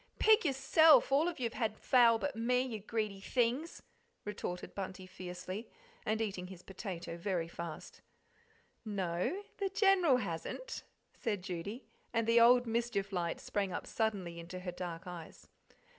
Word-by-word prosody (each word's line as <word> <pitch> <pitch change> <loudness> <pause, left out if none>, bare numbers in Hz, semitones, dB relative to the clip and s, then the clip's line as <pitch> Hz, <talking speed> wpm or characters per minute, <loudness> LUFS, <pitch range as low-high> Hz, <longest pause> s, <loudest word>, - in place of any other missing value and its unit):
"Pig 435 +1 +6
yourself 285 +2 +6
all 290 +5 +4
of 350 -4 -3
you've 235 -2 -1
had 220 -3 -1
fowl 235 -3 +5
but 285 +4 -3
me, 250 +3 +2
you 235 -4 -4
greedy 210 -1 -3
things!" 250 - 0 0.4
retorted 190 -3 -5
Bunty 190 -1 -5
fiercely, 185 +3 -7 0.4
and 220 0 +1
eating 195 -4 -2
up - - -10
his 185 -2 -11
potato 185 -3 -6
very 170 -2 -1
fast. 170 -1 -7 0.8
"No, 200 - -2
the 395 -2 0
General 385 - +4
hasn't," 200 - -4 0.3
said 205 -5 -2
Judy 195 +7 -5 0.3
and 230 -1 +2
the 230 +1 +5
old 245 +1 +7
mischief 230 -3 -1
light 170 -2 -1
sprang 200 -2 -2
up - - -4
suddenly 195 -7 -2
into 175 +2 -7
her 180 -1 -4
dark 175 0 -6
eyes. 175 -3 -9
210 Hz, 150 wpm, -34 LUFS, 180-250 Hz, 0.8 s, old